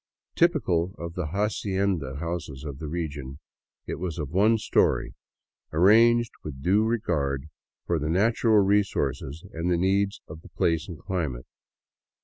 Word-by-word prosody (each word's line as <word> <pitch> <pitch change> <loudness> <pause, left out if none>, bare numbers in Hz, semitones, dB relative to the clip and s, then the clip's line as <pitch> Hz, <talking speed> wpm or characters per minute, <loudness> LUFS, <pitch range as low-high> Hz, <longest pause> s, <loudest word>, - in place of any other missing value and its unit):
Typical 95 - +2
of 85 -1 -6
the 90 -3 -3
hacienda 95 -6 -1
houses 75 -3 -5
of 70 -3 -6
the 80 - -5
region, 75 -4 -5 0.5
it - - -5
was 85 -1 -4
of 75 -4 -4
one 105 +5 +4
story, 105 - +1 0.6
arranged 115 +7 +5
with 70 -3 -7
due 100 +6 +3
regard 80 - -1 0.4
for 85 -2 0
the 75 +1 -2
natural 110 +5 +3
resources 80 -7 0
and 80 +2 -2
the 90 - +2
needs 100 +2 +1
of 80 +1 -10
the - - -15
place 80 0 0
and 85 - -7
climate. 75 -10 -3
85 Hz, 140 wpm, -26 LUFS, 75-100 Hz, 0.6 s, arranged